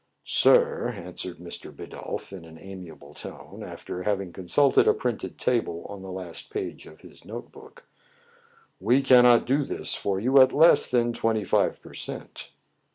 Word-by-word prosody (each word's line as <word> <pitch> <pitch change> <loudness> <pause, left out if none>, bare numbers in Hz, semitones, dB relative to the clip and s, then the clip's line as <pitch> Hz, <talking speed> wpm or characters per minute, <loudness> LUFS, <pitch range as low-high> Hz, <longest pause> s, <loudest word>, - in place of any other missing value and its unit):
"Sir," 475 -1 +4
answered 90 -2 -7
Mr. 85 0 -8
Bidulph - - -8
in 95 -3 -9
an 80 0 -13
amiable 85 -6 -11
tone, - - -10
after 90 - -7
having 95 -3 -2
consulted 130 +10 +3
a - - +5
printed 115 -7 -4
table 115 -9 -1
on 100 -1 -8
the 95 0 -8
last 90 -2 -7
page 410 -2 -6
of - - -15
his - - -16
note - - -9
book, 485 - -15 0.5
" 465 -1 -33
we 130 +3 +5
cannot 125 -2 +6
do 140 +4 +1
this - - -1
for 95 -1 -2
you 130 +5 +5
at 130 - +5
less 160 +3 +5
than 120 -1 +1
twenty 110 -2 0
five 90 - +1
per - - -13
cent." - - -8
115 Hz, 165 wpm, -26 LUFS, 95-135 Hz, 0.5 s, cannot